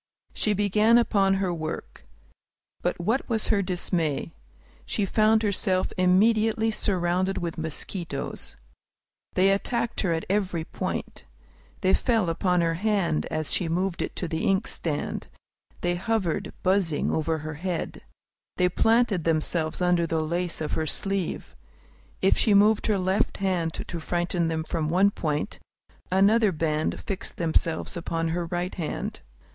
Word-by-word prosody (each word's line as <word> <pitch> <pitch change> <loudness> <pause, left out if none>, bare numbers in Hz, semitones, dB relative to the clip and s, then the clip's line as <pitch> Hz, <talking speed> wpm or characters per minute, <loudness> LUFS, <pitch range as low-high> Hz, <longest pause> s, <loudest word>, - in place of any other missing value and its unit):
She 215 - +1
began 210 +3 +4
upon 195 -5 +3
her 190 -2 0
work. 160 -1 -6 0.7
But - - -1
what 225 +11 0
was 220 -2 0
her 205 -3 +3
dismay! 175 -5 -1 0.5
She 205 - -1
found 215 +2 +3
herself 190 -2 0
immediately 220 +4 +3
surrounded 185 -2 0
with 170 -2 -3
mosquitoes. 160 -1 -4 0.8
They 190 +1 +5
attacked 235 +4 0
her 185 - +1
at 160 -1 -1
every 190 -4 0
point. - - -5 0.6
They 190 0 +3
fell 225 -9 +2
upon 180 +1 +1
her 165 -1 +1
hand 185 -3 0
as 155 -2 -2
she 170 - 0
moved 180 +2 -1
it - - -3
to 175 - -3
the 160 0 -2
inkstand; 185 -6 -1 0.5
they 175 - +1
hovered, 190 -2 -1
buzzing, 185 -5 +1
over 160 0 0
her 155 +1 -5
head; 180 -2 -3 0.6
they 180 -1 +3
planted 225 -2 +2
themselves 160 +1 0
under 175 -1 +3
the 160 -1 0
lace 170 +1 -2
of 155 - -2
her 160 - -1
sleeve. 195 +3 -3 0.7
If - - +4
she 210 -3 +4
moved 210 +1 +4
her 210 -2 +2
left 190 +1 0
hand 180 -4 0
to 170 - -5
frighten 175 +1 -1
them 160 -1 -1
off 160 - -9
from 160 -2 0
one 190 +4 +4
point, 150 -6 -2 0.5
another 205 +3 +4
band 155 -2 -1
fixed 195 - -5
themselves 165 +1 0
upon 165 -1 -2
her 170 +1 -2
right 175 +2 -2
hand. 165 -5 -4
180 Hz, 145 wpm, -26 LUFS, 165-200 Hz, 0.8 s, They